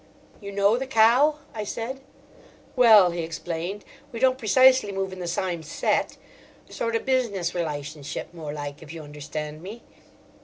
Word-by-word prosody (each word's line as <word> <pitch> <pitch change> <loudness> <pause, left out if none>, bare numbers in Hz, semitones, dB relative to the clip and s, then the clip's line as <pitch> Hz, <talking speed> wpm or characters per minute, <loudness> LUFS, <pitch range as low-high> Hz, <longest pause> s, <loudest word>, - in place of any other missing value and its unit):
"You 200 -1 -7
know 200 +3 +3
the 265 +1 -4
cow?" 260 +5 +4 0.2
I 215 - -4
said. 235 +6 -5 0.7
"Well," 220 -8 +7
he 170 0 -3
explained, 170 +4 -5 0.3
"we 230 - -6
don't 260 +1 +3
precisely 255 0 +5
move 195 -1 -3
in 185 - -9
the 175 - -4
sime 175 0 -2
set. 160 - -1 0.5
Sort 230 -1 -2
o' - - +2
business 225 -10 0
relytionship 150 -3 -5
more 160 -4 -6
like—if 145 +1 -7
you 165 -1 -8
understand 150 +1 -7
me?" 210 +6 -9
195 Hz, 150 wpm, -25 LUFS, 160-230 Hz, 0.7 s, Well